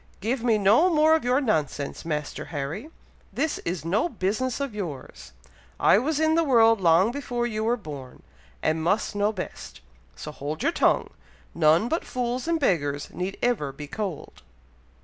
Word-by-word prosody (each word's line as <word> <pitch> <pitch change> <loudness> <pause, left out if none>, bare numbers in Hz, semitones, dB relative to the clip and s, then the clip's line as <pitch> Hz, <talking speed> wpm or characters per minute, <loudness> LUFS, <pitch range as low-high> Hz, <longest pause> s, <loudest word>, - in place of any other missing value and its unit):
"Give 230 +4 -2
me 230 -3 +3
no 215 - +4
more 315 -1 +4
of 320 - +2
your 250 +2 +2
nonsense, 155 - -1
Master 150 -2 -3
Harry! 155 - -5 0.4
This 315 -1 -1
is 165 -2 -4
no 210 - +1
business 235 - -2
of 280 -5 -3
yours! 150 - -7 0.5
I - - +5
was 295 +5 -1
in 315 0 +3
the 330 +1 +3
world 225 -6 +4
long 175 +5 +4
before 245 -3 -3
you 215 -2 -2
were 235 +2 +1
born, 145 - -10 0.4
and 160 +1 +1
must 195 +7 +1
know 205 +1 +2
best; 185 -4 -7 0.4
so 150 - -7
hold 150 +1 -5
your - - +3
tongue. - - +2 0.4
None 160 +8 +4
but 325 +6 -1
fools 250 +2 -3
and 335 -1 +1
beggars 145 - 0
need 185 +2 -4
ever 225 - +1
be 145 +2 -8
cold." 185 0 -6
215 Hz, 170 wpm, -25 LUFS, 160-250 Hz, 0.5 s, I